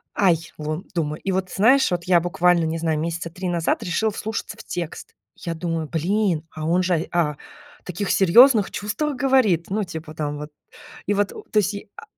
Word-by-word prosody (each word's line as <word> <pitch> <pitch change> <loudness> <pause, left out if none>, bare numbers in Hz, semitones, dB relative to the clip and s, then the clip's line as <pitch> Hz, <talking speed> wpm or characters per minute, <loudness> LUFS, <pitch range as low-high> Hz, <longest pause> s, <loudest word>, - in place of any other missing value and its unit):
Ай, 170 -4 +2
лун 155 +3 -4
думаю, 155 -2 -2
и 195 - -1
вот 185 0 -1
знаешь, 255 +7 +4
вот 175 -1 -1
я 180 -1 +5
буквально, 175 -1 +2
не 160 +1 -2
знаю, 160 -2 0
месяца 170 +1 -3
3 180 +1 -4
назад 170 -2 0
решила 215 +5 0
вслушаться 220 +1 -5
в - - -11
текст. 170 -3 -6 0.2
Я 170 -1 -5
думаю, 165 -2 -3
блин, 175 0 0
а 155 0 -5
он 175 +2 +2
же, 175 -3 0
а, 170 -4 +2
о 145 - -13 0.5
таких 190 +3 -3
серьезных 215 +3 +6
чувствах 245 +9 -2
говорит. 250 - +2
Ну, 210 +2 0
типа 160 -4 -7
там 150 -1 -3
вот 150 +1 -7 0.6
и 205 - +1
вот, 205 -1 +1 0.2
то 215 - +3
есть, 205 0 +1 0.2
а, - - -10
175 Hz, 190 wpm, -23 LUFS, 165-205 Hz, 0.6 s, серьезных